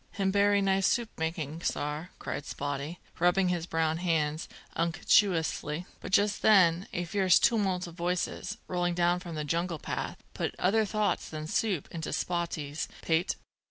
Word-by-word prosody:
"Him 195 Hz, -1 st, +1 dB
bery 200 Hz, 0 st, +4 dB
nice 195 Hz, 0 st, +3 dB
soup 235 Hz, +1 st, 0 dB
making, 160 Hz, -1 st, -3 dB
sar!" 150 Hz, +4 st, -2 dB
cried 145 Hz, -, -5 dB
Spottie, 145 Hz, +4 st, -4 dB, 0.2 s
rubbing 180 Hz, +1 st, +3 dB
his 175 Hz, -1 st, -1 dB
brown 160 Hz, -1 st, +1 dB
hands 160 Hz, -3 st, 0 dB, 0.3 s
unctuously. 165 Hz, -2 st, +2 dB
But -, -, -7 dB
just 205 Hz, +1 st, +3 dB
then 185 Hz, -4 st, +5 dB
a 175 Hz, -, -2 dB
fierce 185 Hz, 0 st, +4 dB
tumult 195 Hz, -6 st, +2 dB
of 170 Hz, -, -9 dB
voices, 180 Hz, +3 st, -2 dB
rolling 175 Hz, -1 st, 0 dB
down 175 Hz, 0 st, +2 dB
from 175 Hz, -3 st, -7 dB
the 155 Hz, -, -2 dB
jungle 170 Hz, +2 st, -1 dB
path, -, -, -4 dB, 0.2 s
put -, -, -2 dB
other 215 Hz, +4 st, +3 dB
thoughts 210 Hz, 0 st, 0 dB
than 155 Hz, -1 st, -5 dB
soup 185 Hz, 0 st, 0 dB
into 165 Hz, -1 st, -4 dB
Spottie's 165 Hz, -4 st, -2 dB, 0.2 s
pate. 165 Hz, +2 st, +1 dB
175 Hz, 155 wpm, -30 LUFS, 160-195 Hz, 0.3 s, then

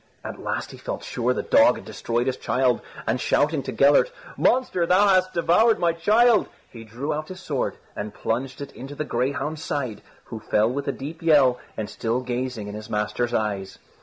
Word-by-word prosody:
At -, -, -7 dB
last -, -, -3 dB
he -, -, -12 dB
felt -, -, -5 dB
sure -, -, -1 dB
the -, -, -1 dB
dog -, -, +5 dB
had -, -, -10 dB
destroyed 120 Hz, +1 st, -2 dB
his 130 Hz, -1 st, 0 dB
child, 125 Hz, -1 st, +1 dB, 0.2 s
and 120 Hz, +3 st, 0 dB
shouting 150 Hz, 0 st, +2 dB
to 130 Hz, -, -5 dB
Gellert, 140 Hz, -, +4 dB, 0.2 s
"Monster, 240 Hz, -9 st, +2 dB
thou 195 Hz, +3 st, +5 dB
hast 185 Hz, -1 st, +3 dB
devoured 180 Hz, +7 st, +4 dB
my 170 Hz, -1 st, +2 dB
child," 215 Hz, +7 st, +4 dB, 0.2 s
he 115 Hz, -2 st, -10 dB
drew 120 Hz, +7 st, -4 dB
out 155 Hz, +1 st, -4 dB
his 185 Hz, 0 st, -9 dB
sword -, -, -2 dB, 0.2 s
and 105 Hz, 0 st, -5 dB
plunged 130 Hz, +7 st, -3 dB
it 140 Hz, -, -6 dB
in 130 Hz, -, -9 dB
the 145 Hz, +2 st, -5 dB
greyhound's 140 Hz, +5 st, -2 dB
side, 130 Hz, -7 st, -3 dB, 0.2 s
who 115 Hz, -, -8 dB
fell 105 Hz, +2 st, +1 dB
with 140 Hz, +2 st, -4 dB
a -, -, +2 dB
deep 150 Hz, +5 st, -8 dB
yell 140 Hz, -6 st, +4 dB, 0.2 s
and 110 Hz, -, -3 dB
still 115 Hz, +4 st, -2 dB
gazing 125 Hz, -3 st, -3 dB
in 105 Hz, -, -6 dB
his 105 Hz, 0 st, -8 dB
master's 105 Hz, +3 st, -1 dB
eyes. 100 Hz, -3 st, -2 dB
135 Hz, 195 wpm, -24 LUFS, 115-165 Hz, 0.2 s, dog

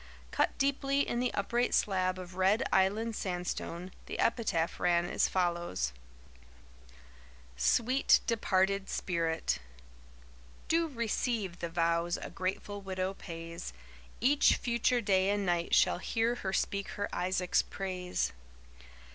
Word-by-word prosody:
Cut -, -, +1 dB
deeply 275 Hz, 0 st, +1 dB
in 240 Hz, -, -1 dB
the 250 Hz, 0 st, +1 dB
upright 235 Hz, +5 st, +1 dB
slab 185 Hz, -2 st, +1 dB
of 180 Hz, -1 st, -8 dB
red 190 Hz, +4 st, +3 dB
Island 215 Hz, +4 st, +2 dB
sandstone, 180 Hz, -1 st, -4 dB, 0.2 s
the -, -, -5 dB
epitaph 215 Hz, -8 st, 0 dB
ran 175 Hz, -1 st, +3 dB
as -, -, +1 dB
follows: 175 Hz, -, -1 dB, 1.6 s
SWEET 250 Hz, -, +4 dB
DEPARTED 195 Hz, -3 st, +1 dB
SPIRIT 165 Hz, -, -1 dB, 1.1 s
Do 330 Hz, 0 st, +2 dB
receive 230 Hz, -, -2 dB
the 170 Hz, -, -3 dB
vows 170 Hz, 0 st, +1 dB
a -, -, -7 dB
grateful 195 Hz, +2 st, -3 dB
widow 190 Hz, 0 st, -2 dB
pays, 165 Hz, -, -7 dB, 0.5 s
Each 280 Hz, +4 st, +4 dB
future 240 Hz, +1 st, +1 dB
day 190 Hz, -2 st, +3 dB
and 205 Hz, -1 st, 0 dB
night 175 Hz, -1 st, +1 dB
shall -, -, +4 dB
hear 225 Hz, +4 st, 0 dB
her 195 Hz, -5 st, -3 dB
speak 200 Hz, 0 st, -1 dB
her 205 Hz, -, -2 dB
Isaac's 180 Hz, 0 st, +1 dB
praise. 185 Hz, -, -3 dB
190 Hz, 120 wpm, -31 LUFS, 175-230 Hz, 1.6 s, SWEET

